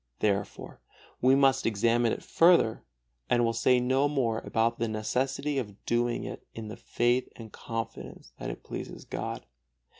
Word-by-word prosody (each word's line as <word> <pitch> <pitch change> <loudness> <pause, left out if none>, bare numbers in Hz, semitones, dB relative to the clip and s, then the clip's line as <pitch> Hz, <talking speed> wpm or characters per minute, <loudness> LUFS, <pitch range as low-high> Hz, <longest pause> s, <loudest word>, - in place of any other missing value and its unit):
Therefore 100 -2 -2 0.4
we 130 +2 +5
must 135 -2 +3
examine 115 +2 +2
it - - -4
further, 165 -10 +4 0.5
and 120 -1 +3
will 115 - +1
say 125 +2 +3
no 130 +3 +2
more 120 -6 0
about 115 +1 0
the 115 - 0
necessity 135 +6 -1
of 105 -5 -8
doing 120 0 0
it - - -7
in 110 -1 -6
the 110 - -6
faith 120 +2 0
and 110 -2 -10
confidence 115 - -6
that - - -4
it - - -7
pleases - - -7
God. - - -5
120 Hz, 155 wpm, -29 LUFS, 115-130 Hz, 0.5 s, we